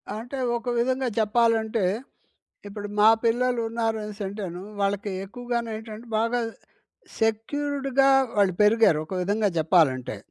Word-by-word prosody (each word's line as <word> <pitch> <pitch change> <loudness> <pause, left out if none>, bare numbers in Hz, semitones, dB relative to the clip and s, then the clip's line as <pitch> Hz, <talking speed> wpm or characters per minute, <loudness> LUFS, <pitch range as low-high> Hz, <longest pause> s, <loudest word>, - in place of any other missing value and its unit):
అంటే 245 +5 -6 0.2
ఒక 245 +1 -5
విధంగా 255 +2 0
చెప్పాలంటే, 220 -1 +2 0.9
ఇప్పుడు 205 0 -7
మా 215 - +8 0.2
పిల్లలున్నారు 230 -2 0
అనేసింటేను 200 -3 -6 0.2
వాళ్ళకి 200 +1 -1
ఎక్కువగానేంటంటే 230 0 -5
బాగా 230 +2 +1 0.8
సెక్యూర్డ్‌గా 275 +4 +1 0.3
వాళ్ళు 200 -3 +3
పెరిగారు, 210 -7 +4
ఒక 190 - -8
విధంగా 205 +3 +1
చెప్పాలంటే. 155 - +2
225 Hz, 100 wpm, -25 LUFS, 205-240 Hz, 0.9 s, మా